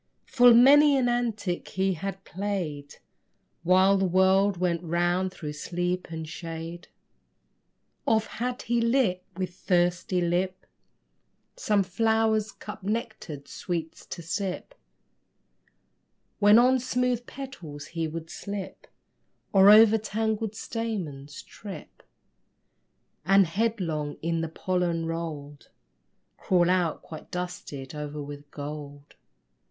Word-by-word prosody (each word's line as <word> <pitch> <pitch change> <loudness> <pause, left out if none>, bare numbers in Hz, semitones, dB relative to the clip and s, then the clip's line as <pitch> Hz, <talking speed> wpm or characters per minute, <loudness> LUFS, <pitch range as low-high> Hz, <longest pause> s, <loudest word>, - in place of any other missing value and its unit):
Full 245 -2 +6
many 285 +4 +7
an 255 -2 +2
antic 225 -7 -1
he 190 0 0
had 195 +3 -5
played 175 -8 -4 0.7
While 185 +3 +4
the 190 - +2
world 190 +2 +3
went 170 -1 0
round 175 +2 0
through 150 -5 -6
sleep 175 +4 -3
and 160 -1 -6
shade. 165 +1 -7 1.2
Oft 220 -1 +2
had 250 +2 -4
he 240 0 +1
lit 230 -7 +2
with 185 -2 -3
thirsty 180 0 +1
lip 180 +2 -1 0.9
Some 205 -2 +1
flower 220 +3 +2 0.2
cup's 210 -2 -9
nectared 205 - -4
sweets 165 +1 -5
to 170 - -7
sip, 195 - -4 1.7
When 205 +1 +7
on 255 +2 +5
smooth 250 -1 -1
petals 170 - -8
he 165 -1 -1
would 165 +1 -7
slip 200 -1 -7 0.7
Or 195 0 +7
over 220 +1 +8
tangled 220 0 -2
stamens 175 - -5
trip, 200 -2 -11 1.2
And 195 +3 +5
headlong 165 -6 -1
in 165 0 0
the 165 - -3
pollen 175 -1 -1
rolled, 155 -4 -6 0.7
Crawl 180 -1 +2
out 180 -3 0
quite 155 - -10
dusted 175 -7 -6
o'er 150 0 -5
with 145 0 -10
gold. 145 0 -8
185 Hz, 110 wpm, -27 LUFS, 165-215 Hz, 1.7 s, over